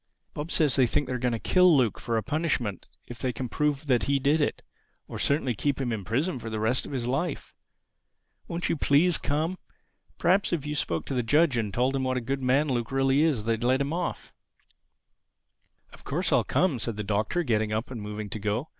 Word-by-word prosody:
"Bob 150 +3 -5
says 150 -6 +2
he 130 -2 +5
thinks 135 +4 0
they - - -1
are 125 - -2
going 125 0 0
to 115 - -1
kill 180 +5 +4
Luke 120 -5 +1
for 115 -1 -1
a 110 - -1
punishment 135 - -2 0.2
if 120 - -10
they 130 - -1
can 125 +2 -5
prove 150 +3 -1
that 125 -4 +2
he 140 0 +2
did 145 +4 +2
it—or 145 - -6
certainly 140 -3 +1
keep 140 +6 -1
him 130 -3 -1
in 110 -3 -3
prison 135 - -1
for 115 - -6
the 110 -1 -3
rest 110 +4 0
of - - -9
his 130 -4 -2
life. 140 +6 -2 0.9
Won't 170 +1 -2
you - - +1
please 155 +4 +3
come? 160 +5 -1 0.6
Perhaps 190 +3 +2
if 155 -4 -1
you 150 - -3
spoke 85 - -1
to - - -4
the 125 - +1
judge 145 +4 +3
and 110 -3 -1
told 125 +6 +1
him 135 - -1
what 130 0 0
a - - +1
good 135 +3 -3
man 135 +4 +2
Luke 120 -3 -2
really 135 +1 +2
is 145 -10 +1
they'd 115 0 0
let 130 +2 +3
him 140 +2 -1
off." 180 - -4 1.6
"Of - - -14
course - - -1
I'll - - +4
come," 165 -10 +1
said 110 -1 -4
the 105 - -3
Doctor 105 - 0
getting 110 -6 0
up 110 +4 -2
and 120 -4 -6
moving 105 0 -5
to 110 - -4
go. 105 +8 -2
130 Hz, 225 wpm, -27 LUFS, 115-150 Hz, 1.6 s, he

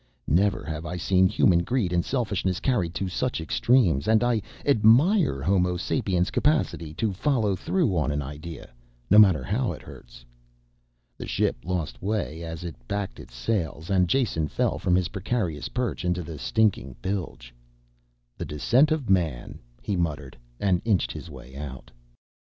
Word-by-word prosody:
Never 95 +3 +2
have 80 +1 -5
I 90 +1 -5
seen 95 +2 +3
human 90 -1 +3
greed 95 -1 -1
and 85 -1 +2
selfishness 100 -8 -1
carried 90 -11 0
to 95 +3 -2
such 125 +6 -2
extremes 85 - +2
and 110 +1 +4
I 120 -3 +2 0.2
admire 135 - +4
Homo 90 +1 +2
sapiens' 95 -2 0
capacity 145 - 0
to 105 +3 -1
follow 110 -2 +1
through 150 - 0
on 75 -3 +1
an 75 0 -2
idea, 75 +1 -8 0.4
no 105 - +8
matter 95 -7 +6
how 115 +5 -1
it - - -11
hurts." - - -13 0.9
The - - -6
ship - - 0
lost 85 -9 -3
way 100 -5 -2
as 80 0 -6
it 85 -2 -5
backed 100 -1 -3
its - - -12
sails 80 - -2
and 90 -2 +3
Jason 95 - +1
fell - - -1
from 90 - +2
his 90 -2 +1
precarious 95 - -2
perch 125 -6 -2
into 90 0 -1
the 80 -2 -8
stinking 100 - +1
bilge. 90 -11 -4 0.9
"The - - -3
descent 120 - +2
of 155 -6 -1
man," 85 -10 0 0.2
he 100 - -1
muttered 75 -6 -3 0.2
and 95 -3 +1
inched 95 - +1
his 85 - -8
way 65 -2 -12
out. 70 -3 -8
90 Hz, 160 wpm, -26 LUFS, 80-110 Hz, 0.9 s, no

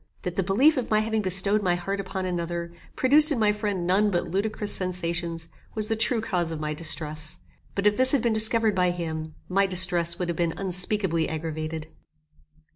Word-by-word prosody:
That 180 -1 -4
the - - +1
belief 250 - +3
of 250 - -2
my 215 0 +3
having 220 0 -1
bestowed 195 +2 +4
my 180 -3 +1
heart 195 +3 -4
upon 190 -1 -4
another, 170 -1 -3 0.2
produced 300 +4 +5
in 285 - +1
my 215 -2 +3
friend 205 -4 -3
none 195 +4 +2
but 175 -3 -1
ludicrous 205 +2 -2
sensations, 170 -2 -2 0.3
was 215 0 -2
the 225 - +1
true 225 +1 +1
cause 175 -6 -1
of 160 - -5
my 150 0 -3
distress; 155 0 -4 0.4
but 200 - -2
if 210 0 +3
this 260 0 +6
had 275 -5 +2
been 235 -2 +1
discovered 220 0 +4
by 180 -1 +2
him, 160 -3 -5
my 195 +2 +2
distress 175 -2 +1
would 180 - -3
have 170 - -2
been 170 0 -1
unspeakably 185 -2 0
aggravated. 155 0 -5
185 Hz, 195 wpm, -25 LUFS, 170-210 Hz, 0.4 s, this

